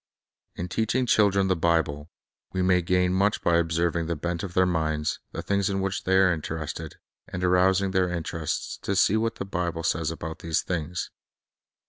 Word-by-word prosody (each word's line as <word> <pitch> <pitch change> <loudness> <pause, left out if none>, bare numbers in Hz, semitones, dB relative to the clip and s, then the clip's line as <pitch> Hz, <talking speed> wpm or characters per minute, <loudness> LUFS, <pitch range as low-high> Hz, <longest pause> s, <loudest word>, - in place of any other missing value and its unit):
In 85 - -4
teaching 115 +7 0
children 100 -4 +3
the 95 - +2
Bible, 80 -3 0 0.4
we 95 -1 0
may 90 -1 +4
gain 90 +1 +2
much 100 +2 +1
by 85 -1 +4
observing 85 0 0
the 85 - -1
bent 85 +2 -3
of 90 -3 -6
their 95 - +5
minds, 80 -3 -1
the - - -5
things 100 -1 +1
in 95 -1 -1
which 95 0 -2
they 95 0 +3
are 95 -2 +5
interested, 80 -1 -5 0.3
and 90 0 -5
arousing 95 +2 +3
their 95 -1 +2
interest 80 -2 -3
to 100 - -1
see 95 +2 +4
what 115 +1 0
the - - -5
Bible 85 -3 -3
says 80 -1 0
about 80 0 -6
these 80 -1 -1
things. 85 0 -3
90 Hz, 180 wpm, -26 LUFS, 80-95 Hz, 0.4 s, their